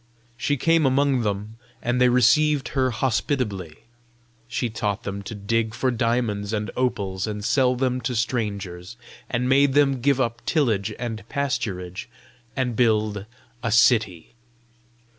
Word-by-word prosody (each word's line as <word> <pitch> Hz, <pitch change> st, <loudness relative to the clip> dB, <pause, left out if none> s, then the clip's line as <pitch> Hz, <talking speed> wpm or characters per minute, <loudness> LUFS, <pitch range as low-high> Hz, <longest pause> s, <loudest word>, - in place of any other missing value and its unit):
She 145 Hz, +4 st, -1 dB
came 165 Hz, +1 st, +3 dB
among 135 Hz, -1 st, +2 dB
them, 105 Hz, +1 st, -3 dB, 0.2 s
and 120 Hz, +1 st, -1 dB
they 125 Hz, -, +6 dB
received 135 Hz, +4 st, +3 dB
her 130 Hz, -2 st, +1 dB
hospitably. 110 Hz, -, -2 dB, 0.6 s
She 120 Hz, +1 st, -2 dB
taught 105 Hz, -2 st, -3 dB
them 100 Hz, 0 st, -4 dB
to 105 Hz, +2 st, -7 dB
dig 110 Hz, +2 st, -1 dB
for 130 Hz, +1 st, 0 dB
diamonds 115 Hz, -3 st, -1 dB
and 105 Hz, -2 st, -2 dB
opals 100 Hz, -6 st, -1 dB
and 105 Hz, -1 st, -4 dB
sell 130 Hz, -1 st, +3 dB
them 130 Hz, 0 st, -1 dB
to 125 Hz, +2 st, -2 dB
strangers, 105 Hz, -4 st, -3 dB, 0.3 s
and 125 Hz, 0 st, -1 dB
made 135 Hz, +1 st, +4 dB
them 140 Hz, -3 st, +3 dB
give 140 Hz, +1 st, +2 dB
up 115 Hz, -2 st, -1 dB
tillage 115 Hz, -, +1 dB
and 115 Hz, -4 st, -5 dB
pasturage 100 Hz, -10 st, -3 dB, 0.5 s
and 125 Hz, -3 st, -1 dB
build 105 Hz, -3 st, +1 dB, 0.3 s
a 115 Hz, -, -2 dB
city. 110 Hz, -6 st, +3 dB
115 Hz, 140 wpm, -24 LUFS, 105-130 Hz, 0.6 s, they